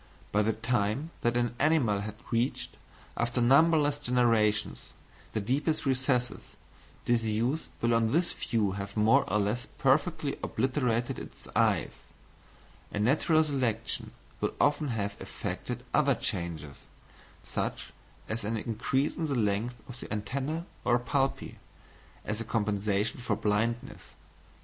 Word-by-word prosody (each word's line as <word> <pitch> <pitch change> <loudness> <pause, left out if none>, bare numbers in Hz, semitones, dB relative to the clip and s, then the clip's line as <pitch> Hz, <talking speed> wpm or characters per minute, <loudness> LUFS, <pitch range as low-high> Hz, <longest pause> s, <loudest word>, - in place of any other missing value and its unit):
By 105 - +3
the 110 +1 +2
time 115 +6 0
that 120 +1 +2
an 120 -1 +1
animal 135 -9 +3
had 105 0 -5 0.2
reached, 120 +3 0 0.4
after 120 +1 0
numberless 145 +3 +5
generations, 115 -5 +1 0.4
the - - 0
deepest 140 +10 0
recesses, 130 -2 +1 0.6
disuse 120 +5 +1
will 120 0 +3
on 115 -1 +3
this 170 +3 +2
view 105 -4 0
have 100 +1 -5
more 110 -1 +4
or 105 - +3
less 105 +4 0
perfectly - - +1
obliterated 125 -1 0
its - - -10
eyes, - - +1 0.9
and 105 +1 0
natural 155 +5 +4
selection 130 -7 -1 0.3
will - - -1
often 150 +1 +3
have 100 -5 -2
effected - - -5
other - - +4
changes, 80 -5 -4 0.6
such - - -4 0.3
as 110 0 -3
an 110 +2 -1
increase 125 +6 0
in 165 -2 -1
the 140 - -1
length 110 +2 0
of 125 -1 -9
the - - -7
antennæ 135 +10 -3 0.2
or 120 - +4
palpi, 135 +3 -1 0.7
as 110 +1 -2
a - - -1
compensation 105 -1 0
for 125 - 0
blindness. 110 +3 -1
120 Hz, 130 wpm, -30 LUFS, 105-135 Hz, 0.9 s, numberless